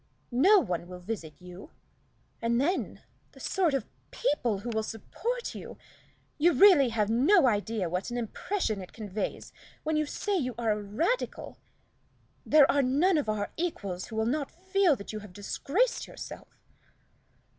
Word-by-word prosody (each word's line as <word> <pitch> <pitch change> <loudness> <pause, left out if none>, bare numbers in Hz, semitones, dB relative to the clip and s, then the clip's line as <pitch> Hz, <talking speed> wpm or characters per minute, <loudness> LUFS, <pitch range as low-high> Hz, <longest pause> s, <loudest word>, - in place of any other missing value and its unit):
No 345 - +6
one 175 - -1
will 180 0 -8
visit 180 -5 -6
you. 180 - -11 0.7
And 235 +1 +1
then 345 +8 -1 0.3
the - - -15
sort 350 -7 +1
of 265 - -1 0.2
people 245 - 0
who 240 - -4
will 220 -1 0
support 465 - -4
you! - - -9 0.6
You 340 +3 +5
really 295 -4 +7
have 215 -2 0
no 270 - +5
idea 215 -4 0
what 180 +5 -3
an 240 - -3
impression 230 - -2
it 185 - -11
conveys 210 -2 -5 0.3
when 315 0 0
you 305 -1 +1
say 410 +6 -2
you 255 -9 -1
are 230 -2 +1
a 210 0 -1
Radical. 285 - -2 0.8
There 300 -2 +6
are 285 - +3
none 300 +7 +3
of 280 - -3
our 205 -1 -2
equals 200 - -3
who 220 - -9
will 220 0 +1
not 280 +4 -1
feel 375 -2 +2
that 200 -2 -8
you 215 - -4
have 210 -3 -12
disgraced 290 - -1
yourself." - - -9
240 Hz, 160 wpm, -29 LUFS, 210-325 Hz, 0.8 s, really